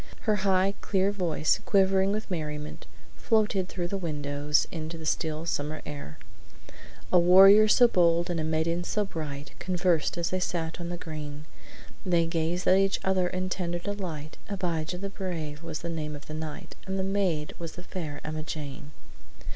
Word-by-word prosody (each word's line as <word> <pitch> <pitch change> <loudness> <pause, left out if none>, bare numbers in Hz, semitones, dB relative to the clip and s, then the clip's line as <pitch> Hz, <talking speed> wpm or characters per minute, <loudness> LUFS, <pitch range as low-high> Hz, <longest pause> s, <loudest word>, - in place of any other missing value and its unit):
Her 215 -2 +2
high, 190 0 +2
clear 195 0 +1
voice, 170 -6 +1
quivering 195 0 +3
with 215 -1 -3
merriment, 150 -3 -4 0.3
floated 210 -5 +1
through 175 -2 -3
the 195 - -2
windows 145 -3 0
into 165 0 -5
the 160 - -8
still 155 +1 -1
summer 155 -1 -2
air: 140 - -7 1.0
"'A 180 - +8
warrior 195 +5 +8
so 245 +3 +6
bold 170 -5 +3
and 175 -2 -2
a - - -1
maiden 160 +2 0
so 210 +3 0
bright 150 -5 -6
Conversed 175 -3 +1
as 170 -1 -1
they 185 - 0
sat 165 -2 -2
on 170 - -4
the 175 - -4
green. 150 -3 -7 0.6
They 170 -2 +2
gazed 165 +2 -1
at 190 - +6
each 195 0 +2
other 190 -1 +2
in 185 +1 -2
tender 175 -2 -2
delight. 175 -6 -5
Abijah 180 -4 -2
the 195 +2 -5
Brave 165 -6 -4
was 165 -2 -5
the - - -3
name 155 -3 -3
of 145 - -10
the 155 - -8
knight, 155 -1 -6
And 190 0 -2
the 190 - 0
maid 190 -6 0
was 165 -1 -6
the 180 - -10
Fair 155 -6 -6
Emmajane.'" 155 -2 -5
170 Hz, 170 wpm, -28 LUFS, 155-190 Hz, 1.0 s, A